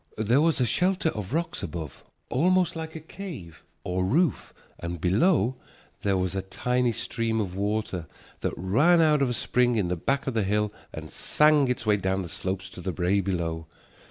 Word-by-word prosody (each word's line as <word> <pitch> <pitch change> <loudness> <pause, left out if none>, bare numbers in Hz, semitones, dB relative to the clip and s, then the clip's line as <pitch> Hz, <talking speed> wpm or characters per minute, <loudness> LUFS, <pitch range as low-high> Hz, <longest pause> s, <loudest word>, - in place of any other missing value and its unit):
There 115 +6 +3
was 165 -2 +2
a 125 - +3
shelter 180 - +1
of 105 -9 -5
rocks 165 +3 -2
above, 80 -4 -6 0.3
almost 180 +6 +2
like 160 0 -6
a - - -4
cave 155 - -9 0.2
or 90 +1 -1
roof, 145 - +1 0.3
and 85 0 -5
below 120 - +2 0.4
there 100 -2 +1
was 90 -1 -1
a 95 - -1
tiny 125 +5 0
stream 115 0 -1
of 95 -4 -3
water 100 -4 -2 0.3
that - - -3
ran 145 - +4
out 155 -3 +4
of 135 - +2
a - - -1
spring 125 0 +2
in 100 -5 0
the 90 - 0
back 140 +11 -1
of 135 - -2
the 115 - +1
hill 105 +1 0 0.2
and - - -8
sang 150 -2 +3
its 125 -2 -2
way 105 -1 +3
down 95 0 -1
the 85 - -7
slope 95 +2 -3
to 95 -1 -9
the 95 - -2
brae 95 +3 +1
below. 85 -4 -2
110 Hz, 190 wpm, -26 LUFS, 95-145 Hz, 0.4 s, ran